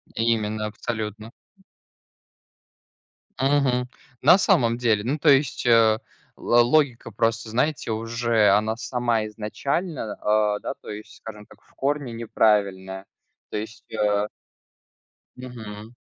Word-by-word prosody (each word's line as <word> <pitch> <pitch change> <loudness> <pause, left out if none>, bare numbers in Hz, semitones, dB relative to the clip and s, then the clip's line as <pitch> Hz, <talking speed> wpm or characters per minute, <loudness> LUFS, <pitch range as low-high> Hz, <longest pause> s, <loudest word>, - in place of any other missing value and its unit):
Именно 110 -2 0
абсолютно. 110 0 -5 2.1
Мгм, 135 -2 +1 0.3
на 185 - +7
самом 120 -10 +2
деле. 110 -4 +1
Ну, 135 +6 -1
то 150 0 +3
есть, 140 -1 +3
э, 115 -2 +5 0.4
ла 120 0 +3
логика 125 -3 +1
просто, 115 +1 -1
знаете, 125 +1 -1
уже 115 -1 +1
она 105 +2 +2
сама 120 -2 -1
изначально, 115 - -3
а, 105 -1 +2
да, - - -4
то - - -11
есть, 105 +1 -9
скажем 105 -2 -10
так, - - -19
в - - -28
корне 140 -2 -2
неправильная. 100 -4 0 0.4
То - - -4
есть, 110 +2 -7
э 105 -1 +1 1.1
Мгм. 115 -3 -9
115 Hz, 115 wpm, -24 LUFS, 105-125 Hz, 2.1 s, на